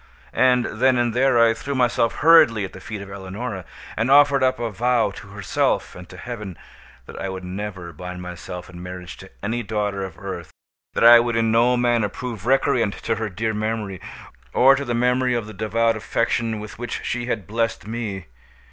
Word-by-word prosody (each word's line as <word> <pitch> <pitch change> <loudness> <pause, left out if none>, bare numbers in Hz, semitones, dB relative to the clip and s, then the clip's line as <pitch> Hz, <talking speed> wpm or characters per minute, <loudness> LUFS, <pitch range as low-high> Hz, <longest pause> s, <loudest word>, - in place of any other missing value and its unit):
And, 125 -1 +3
then 125 +3 +2
and 120 -1 +1
there, 130 +1 +3
I 115 -1 +5
threw 140 +4 -5
myself 120 -2 +1
hurriedly 155 -10 +6
at 95 - -10
the - - -10
feet 105 0 -6
of 100 - -11
Eleonora, 100 +1 -6 0.3
and 110 +4 0
offered 140 0 +6
up 130 0 +2
a 115 -2 -3
vow, 120 0 +1
to 105 +2 -11
herself 100 -2 -1
and 90 -1 -11
to 90 - -11
Heaven, 105 -6 -7 0.5
that - - -10
I 95 - -3
would 95 -1 -6
never 95 -2 -6
bind 90 +3 -7
myself 90 0 -8
in 90 -1 -11
marriage 90 0 -8
to 95 - -12
any 115 +3 -1
daughter 105 -2 -2
of 95 -4 -7
Earth—that 90 -1 -7
I 120 0 +10
would 120 0 0
in 115 -1 +2
no 120 +2 +4
manner 120 -3 +2
prove 115 -1 -7
recreant 130 -5 +2
to - - 0
her 110 0 -3
dear 110 +4 -2
memory, 105 -3 -3 0.5
or 135 +2 +6
to 140 +1 -3
the 120 -1 -1
memory 125 +1 +2
of 115 -3 -2
the 110 - -9
devout 110 +3 +1
affection 115 0 -1
with 105 +1 -9
which 120 - -4
she 120 0 -2
had 105 -6 -2
blessed 115 +3 -2
me. 105 -5 -5
110 Hz, 195 wpm, -22 LUFS, 95-120 Hz, 0.5 s, I